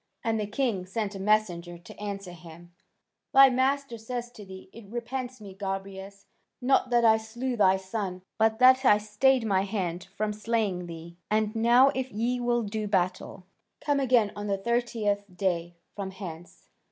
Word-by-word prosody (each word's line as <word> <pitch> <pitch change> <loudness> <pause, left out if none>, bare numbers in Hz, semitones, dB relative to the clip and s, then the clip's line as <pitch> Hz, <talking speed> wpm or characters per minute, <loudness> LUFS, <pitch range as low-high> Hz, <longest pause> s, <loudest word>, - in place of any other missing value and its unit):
And 225 -1 0
the 210 - -2
king 210 -5 -1
sent 210 +1 -3
a 195 - -7
messenger 185 -4 0
to 175 - -14
answer 200 -3 -5
him: 175 0 -13 0.6
"Thy 270 -1 +9
master 260 -1 0
says 240 +1 -5
to 215 - -12
thee: 190 -1 -11
'It 225 -3 -12
repents 245 +2 -5
me, 200 -3 -10
Gobryas, 195 0 -6 0.3
not 255 0 +2
that 240 -1 +3
I 220 -1 +6
slew 240 +3 -4
thy 190 -4 +4
son, 190 -1 -5 0.2
but 220 0 +3
that 260 +2 +6
I 210 -5 +6
stayed 225 +4 +2
my 195 -3 +2
hand 185 -3 -3
from 215 0 -1
slaying 210 -5 -1
thee. 170 0 -10
And 215 +1 0
now 240 +4 +5
if 260 -2 -3
ye 240 +4 -1
will 240 -1 +1
do 215 0 -3
battle, 185 -1 -1 0.3
come 290 -1 0
again 245 -6 +3
on 205 0 -5
the 200 -1 0
thirtieth 220 -2 -1
day 175 -3 -1 0.2
from 200 -2 -4
hence. 175 -3 -10
210 Hz, 170 wpm, -27 LUFS, 190-240 Hz, 0.6 s, Thy